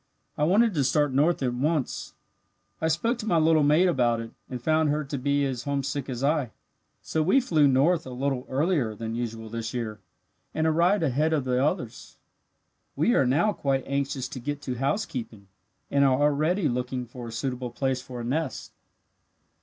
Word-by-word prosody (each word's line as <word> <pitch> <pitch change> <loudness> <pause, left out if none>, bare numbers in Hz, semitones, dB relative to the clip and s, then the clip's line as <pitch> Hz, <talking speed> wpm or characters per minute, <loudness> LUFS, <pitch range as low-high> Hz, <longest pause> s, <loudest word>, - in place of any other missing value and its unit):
I 150 - +1
wanted 210 +6 +4
to 145 -4 +1
start 145 +1 +2
north 150 +3 +2
at 125 -2 0
once. 145 +2 -2 0.7
"I 160 - +2
spoke 225 +10 0
to 220 - -5
my 175 - +3
little 160 0 +4
mate 150 +5 +4
about 120 -8 +2
it, 115 0 -7 0.2
and 125 - -5
found 155 +4 +2
her 150 +1 0
to 140 0 -4
be 140 +2 +1
as 130 -1 -3
homesick 140 -1 -2
as 125 0 -4
I. 145 -3 +1 0.5
So 160 - -1
we 185 - +4
flew 160 - +3
north 145 +5 +2
a - - -6
little 130 0 -2
earlier 140 - 0
than 115 +1 -5
usual 115 -1 -4
this 115 +1 -5
year, 110 -3 -4 0.6
and 160 - +1
arrived 170 +5 +3
ahead 155 +3 +1
of 150 -4 +1
the 125 0 +1
others. 150 +6 -3 0.8
We 240 - +2
are 135 - +3
now 170 +12 +2
quite 135 -5 -1
anxious 140 -1 -2
to 130 - -7
get 145 +3 -4
to 130 - -3
housekeeping, 120 - -3 0.4
and 140 0 +3
are 130 -1 +3
already 155 +5 +2
looking 125 0 -2
for 120 0 -9
a - - -7
suitable 125 +1 -3
place 130 +1 -1
for 125 -1 -8
a - - -5
nest." 150 +7 -3
140 Hz, 185 wpm, -26 LUFS, 125-155 Hz, 0.8 s, wanted